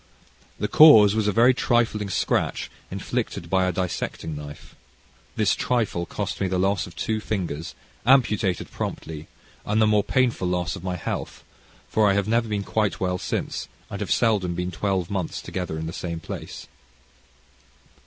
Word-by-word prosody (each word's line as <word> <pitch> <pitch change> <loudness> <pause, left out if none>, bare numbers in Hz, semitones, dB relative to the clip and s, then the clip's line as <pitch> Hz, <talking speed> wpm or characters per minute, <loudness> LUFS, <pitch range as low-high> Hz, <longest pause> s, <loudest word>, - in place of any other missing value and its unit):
The - - -1
cause 110 -10 +8
was 110 -1 0
a - - +3
very 120 +5 +5
trifling 115 -5 +1
scratch - - -1 0.2
inflicted 85 - -4
by 95 -1 +3
a - - +1
dissecting 85 -3 -3
knife. 75 0 -9 0.6
This - - +2
trifle 110 -8 -1
cost - - -4
me 95 - +2
the 95 0 -1
loss 95 0 +1
of 85 - -13
two 110 +7 -1
fingers, 90 -8 -4 0.3
amputated 110 - +2
promptly, 80 -1 -5 0.4
and 105 +2 0
the 110 - +5
more 105 -1 +3
painful 120 -7 +1
loss 90 0 -1
of 90 - -9
my 90 -1 -2
health, 90 - -5 0.4
for 110 -2 +3
I - - +4
have 100 0 0
never 115 +1 +2
been 105 -1 -1
quite 105 -1 0
well 90 -1 -1
since, - - -3 0.2
and - - -5
have - - -3
seldom 100 -7 +2
been 90 +1 -2
twelve 95 0 -1
months 95 -5 -2
together 90 -4 -4
in 80 - -4
the 80 - -5
same 85 -2 -4
place. 80 - -7
95 Hz, 165 wpm, -24 LUFS, 90-110 Hz, 0.6 s, cause